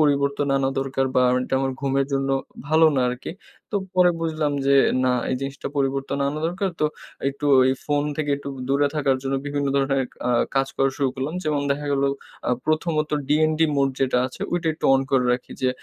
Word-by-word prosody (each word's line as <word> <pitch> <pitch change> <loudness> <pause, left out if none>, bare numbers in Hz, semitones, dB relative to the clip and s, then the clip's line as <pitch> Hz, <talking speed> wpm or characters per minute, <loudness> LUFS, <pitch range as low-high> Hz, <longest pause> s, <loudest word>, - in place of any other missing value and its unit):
পরিবর্তন 140 -1 +2
আনা 135 -1 +1
দরকার 135 0 -1
বা 125 - +4 0.2
এটা 130 - -2
আমার 135 0 -1
ঘুমের 135 0 +1
জন্য 135 0 0 0.4
ভালো 160 +2 +5
না - - +3
আরকি। 125 +5 -6 0.4
তো 205 - +1 0.2
পরে 180 -1 +5
বুঝলাম 155 -3 -1
যে 140 - +4 0.3
না 130 - +3 0.2
এই - - +1
জিনিসটা 135 0 -5
পরিবর্তন 135 0 -1
আনা 145 +2 -2
দরকার 185 +3 -1
তো - - +3 0.4
একটু 140 +1 -4 0.2
এই 130 - +2
ফোন 145 -1 +1
থেকে 150 -2 -1
একটু 140 0 -8 0.2
দূরে 140 +1 +3
থাকার 140 -3 +2
জন্য 135 0 -1
বিভিন্ন 145 0 -1
ধরনের 135 0 +2 0.3
আ - - +2 0.2
কাজ 135 0 +2
করা 135 0 +2
শুরু 140 -2 +1
করলাম। 135 +5 -3
যেমন 150 -2 0
দেখা 145 +1 -1
গেলো 140 0 +2 0.4
আ - - +2 0.2
১ম 155 +2 +1 0.2
ত - - -7 0.2
ডিএনডি 155 +2 +3
মোড 140 -1 +3
যেটা 130 -2 +2
আছে 130 - -11
ঐইটা 175 -2 0
একটু - - -11
অন 135 - +3
করে 130 -2 +3
রাখি 125 0 -4
যে 130 - +3
140 Hz, 200 wpm, -23 LUFS, 135-150 Hz, 0.4 s, ভালো